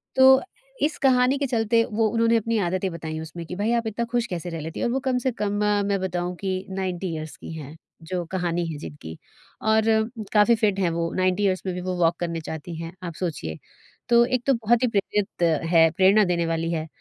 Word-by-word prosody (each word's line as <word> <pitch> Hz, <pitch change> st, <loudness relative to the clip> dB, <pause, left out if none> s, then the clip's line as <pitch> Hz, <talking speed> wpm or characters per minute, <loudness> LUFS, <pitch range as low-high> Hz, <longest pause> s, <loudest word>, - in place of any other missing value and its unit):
तो 265 Hz, 0 st, +7 dB, 0.4 s
इस 300 Hz, -, +1 dB
कहानी 260 Hz, 0 st, +3 dB
के 280 Hz, -, -1 dB
चलते, 230 Hz, -1 st, +2 dB
वो 220 Hz, +1 st, +1 dB
उन्होंने 230 Hz, +1 st, +3 dB
अपनी 230 Hz, +1 st, 0 dB
आदतें 185 Hz, +2 st, -1 dB
बताई 160 Hz, -1 st, -5 dB
उसमें 160 Hz, +1 st, -7 dB
कि, 180 Hz, -, -6 dB
"भई, 205 Hz, +4 st, 0 dB
आप 235 Hz, -1 st, 0 dB
इतना 230 Hz, +2 st, -2 dB
खुश 240 Hz, -1 st, +1 dB
कैसे 175 Hz, -1 st, -4 dB
रह 165 Hz, -1 st, -5 dB
लेती 160 Hz, +1 st, -6 dB
हैं?" -, -, 0 dB
और -, -, -1 dB
वो 265 Hz, -, +1 dB
कम 255 Hz, -1 st, +2 dB
से 260 Hz, -, +3 dB
कम 205 Hz, -1 st, 0 dB, 0.4 s
मैं 200 Hz, -1 st, +1 dB
बताऊँ 180 Hz, -1 st, -2 dB
कि 195 Hz, -1 st, -2 dB, 0.2 s
90 190 Hz, -1 st, -3 dB
यीअर्स 155 Hz, -1 st, -6 dB
की -, -, -9 dB
हैं 155 Hz, -1 st, -8 dB, 0.4 s
जो 180 Hz, -1 st, -1 dB
कहानी 175 Hz, -1 st, -1 dB
है 155 Hz, -, -6 dB
जिनकी, 80 Hz, -, -9 dB, 0.4 s
और 220 Hz, 0 st, +3 dB, 0.5 s
काफ़ी 215 Hz, +2 st, +5 dB
फिट 205 Hz, -2 st, +2 dB
हैं 185 Hz, -3 st, +2 dB
वो, 165 Hz, 0 st, -2 dB
90 185 Hz, +2 st, +1 dB
यीअर्स 190 Hz, -2 st, +1 dB
में 185 Hz, -, -2 dB
भी 180 Hz, -, -4 dB
वो 185 Hz, 0 st, -3 dB
वॉक 165 Hz, +1 st, +3 dB
करने 170 Hz, -1 st, -2 dB
जाती 160 Hz, +2 st, -6 dB
हैं, 165 Hz, +1 st, -6 dB
आप 170 Hz, -2 st, -5 dB
सोचिए। 85 Hz, -, -3 dB, 0.5 s
तो 235 Hz, 0 st, +6 dB
एक 250 Hz, 0 st, -1 dB
तो 275 Hz, -, +5 dB
बहुत 235 Hz, 0 st, +2 dB
ही -, -, +4 dB
प्रेरित 200 Hz, -2 st, -1 dB, 0.3 s
है 165 Hz, -1 st, +7 dB
प्रेरणा 195 Hz, +3 st, +6 dB
देने 170 Hz, -1 st, +1 dB
वाली 165 Hz, 0 st, -1 dB
है। 160 Hz, -1 st, -2 dB
185 Hz, 220 wpm, -24 LUFS, 170-230 Hz, 0.5 s, तो